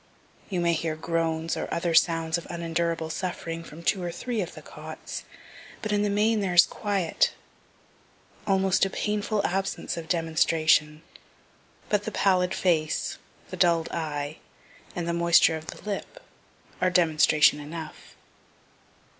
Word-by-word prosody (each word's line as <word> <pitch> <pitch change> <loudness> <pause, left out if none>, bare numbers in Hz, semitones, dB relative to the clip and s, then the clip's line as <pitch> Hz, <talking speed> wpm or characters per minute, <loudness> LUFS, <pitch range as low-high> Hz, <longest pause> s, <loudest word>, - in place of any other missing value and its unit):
You 185 -3 -1
may 170 0 +2
hear 160 -1 -1
groans 165 0 -1
or - - -4
other 170 0 -1
sounds 165 0 +3
of 170 - -12
unendurable 170 -1 -2
suffering 165 -2 -4
from 165 +1 -11
two 190 +2 +1
or 175 -1 -3
three 230 +5 -3
of 180 -1 -6
the - - -11
cots, - - -8 0.6
but 215 - -2
in 205 0 +2
the 205 - +1
main 215 +2 +2
there 190 -3 -1
is 170 - +9
quiet 195 -5 0 1.1
almost 195 -2 +3
a 195 - +3
painful 210 +1 -1
absence 195 0 -2
of 165 -1 -7
demonstration; 160 -2 +2 0.8
but 210 -1 0
the 220 - -3
pallid 185 -3 +2
face, 160 -4 0 0.3
the - - -5
dull'd 170 -2 +3
eye, 150 -2 -3 0.6
and 175 -1 -3
the 170 - 0
moisture 170 -1 +4
of 160 0 -8
the - - -8
lip, 200 -2 -5 0.6
are 185 - +4
demonstration 155 -4 +4
enough. 155 +2 -9
170 Hz, 145 wpm, -26 LUFS, 160-190 Hz, 1.1 s, is